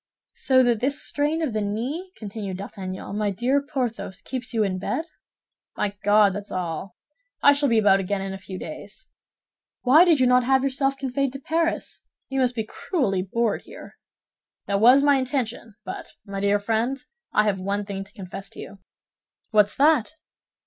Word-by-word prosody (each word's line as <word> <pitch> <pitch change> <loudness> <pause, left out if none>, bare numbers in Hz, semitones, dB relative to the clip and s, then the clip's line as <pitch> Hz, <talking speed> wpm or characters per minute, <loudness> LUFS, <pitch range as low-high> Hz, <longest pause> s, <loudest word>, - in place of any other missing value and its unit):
"So 260 -1 +4
that 240 -3 +2
this 280 +5 0
strain 300 +3 -1
of 275 -8 -1
the 215 - 0
knee," 250 - -3
continued 200 -3 -5
D'Artagnan, 195 0 -6
"my 210 -1 +1
dear 245 +8 +1
Porthos, 250 -9 -4
keeps 250 -1 -5
you 225 -3 +1
in 185 -2 -1
bed?" 260 - -2 0.7
"My 205 -1 -1
God, 205 -1 +5
that's 205 +1 -7
all. 180 0 -4 0.5
I 285 - +8
shall 285 -1 +1
be 230 - +3
about 200 -3 +5
again 195 +1 -2
in 195 0 -4
a 195 - -7
few 190 -1 -8
days." 200 - -8 0.7
"Why 285 +7 +7
did 335 -5 +4
you 255 - +4
not 250 0 +4
have 265 +1 +3
yourself 275 0 0
conveyed 270 0 -1
to 275 - -6
Paris? 330 +4 -1 0.3
You 270 0 -1
must 250 -1 +2
be 220 - -1
cruelly 215 - -1
bored 215 +3 -1
here." - - -13 0.7
"That 200 0 0
was 255 +5 +7
my 285 -1 +5
intention; 245 -4 -3
but, - - -7
my 200 -1 -5
dear 200 +1 +3
friend, 225 +5 0 0.3
I 210 - +4
have 205 -3 0
one 200 +2 -2
thing 195 -1 -5
to 200 - -18
confess 195 -2 -8
to - - -11
you." 200 - -9 0.7
"What's 210 -2 +4
that?" 300 -1 +3
225 Hz, 180 wpm, -24 LUFS, 200-270 Hz, 0.7 s, I